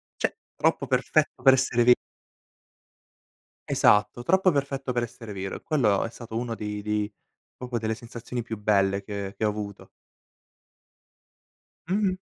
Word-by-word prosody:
Cioè - - -1 0.2
troppo - - +1
perfetto - - +1
per 135 - +8
essere 130 -2 +2
ve 125 +1 +7 1.7
Esatto, 105 +3 +3
troppo 190 +5 +4
perfetto 135 -3 -1
per 120 -1 +1
essere 115 -2 -7
vero 95 0 -4
e - - -16
quello 115 -11 +2
è - - -4
stato 115 -1 -7
uno 120 -1 -2
dei 105 -1 -4
dei 105 0 -1 0.4
proprio 125 -1 -3
delle 110 0 -1
sensazioni 120 +1 -6
più 110 -1 -6
belle 100 -1 +2
che 100 -1 -5
che - - -1
ho 105 - +4
avuto. 105 -1 -6 2.0
Mh-mh. 190 -1 +1
115 Hz, 140 wpm, -26 LUFS, 105-125 Hz, 2.0 s, per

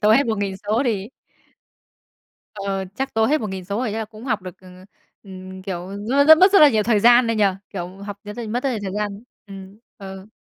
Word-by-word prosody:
tô 210 - +3
hết 275 +4 +4
1.000 200 -3 -2
số 220 +4 +2
thì 210 -5 -2 1.5
Ờ, 195 -1 -3
chắc 270 +4 -4
tô 220 0 +3
hết 305 +5 +1
1.000 190 -4 -5
số 200 +3 -3
rồi 235 -4 -2
chắc 220 - -3
là 220 - -2
cũng 215 +1 -13
học 220 -6 -2
được, 185 0 -10
ừ, 185 - -15 0.5
ừm, 185 -1 -10
kiểu, 185 -1 -6 0.2
nó 280 +3 +4
rất 315 +1 +8
mất 375 +2 +6
rất 400 - +7
là 300 - +9
nhiều 220 -5 +1
thời 215 -1 +2
gian 240 +2 +6
đấy 230 -1 0
nhỉ? 210 - +3 0.3
Kiểu, 180 -1 -7
học 200 0 -8
r - - -12
r - - -5
mất 240 +3 -2
rất 275 - +1
nhiều 235 - -2
thời 190 -2 -4
gian. 205 0 -4 0.2
Ừm, 195 0 -11 0.2
ừ. 190 -1 -9
210 Hz, 235 wpm, -21 LUFS, 195-235 Hz, 1.5 s, là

